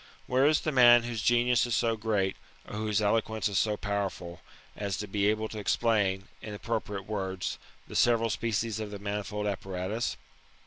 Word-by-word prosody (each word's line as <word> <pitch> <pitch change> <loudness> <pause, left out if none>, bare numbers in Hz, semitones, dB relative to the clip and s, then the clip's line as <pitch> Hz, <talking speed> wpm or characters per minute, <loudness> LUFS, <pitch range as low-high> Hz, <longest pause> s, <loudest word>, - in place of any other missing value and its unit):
Where 130 +3 +3
is 155 0 +3
the 155 - -1
man 120 -3 +7
whose 120 -2 -3
genius 120 +1 +3
is 120 - 0
so 115 -1 +2
great 105 -3 0 0.3
or - - -7
whose 105 0 0
eloquence 110 +1 +1
is 100 -2 +1
so 105 -1 +1
powerful, 95 -5 -3 0.3
as 100 -3 -3
to 105 - -4
be 100 0 +1
able 110 +1 +1
to 110 - -6
explain, 100 -3 +1
in 105 -1 -6
appropriate 105 -3 -3
words, 95 -3 -3 0.3
the - - -9
several 115 -1 +3
species 110 0 -1
of 110 -1 -4
the 105 - -6
manifold 105 +1 -3
appa 100 -1 -3
ratus 95 +6 -2
105 Hz, 180 wpm, -29 LUFS, 100-115 Hz, 0.3 s, man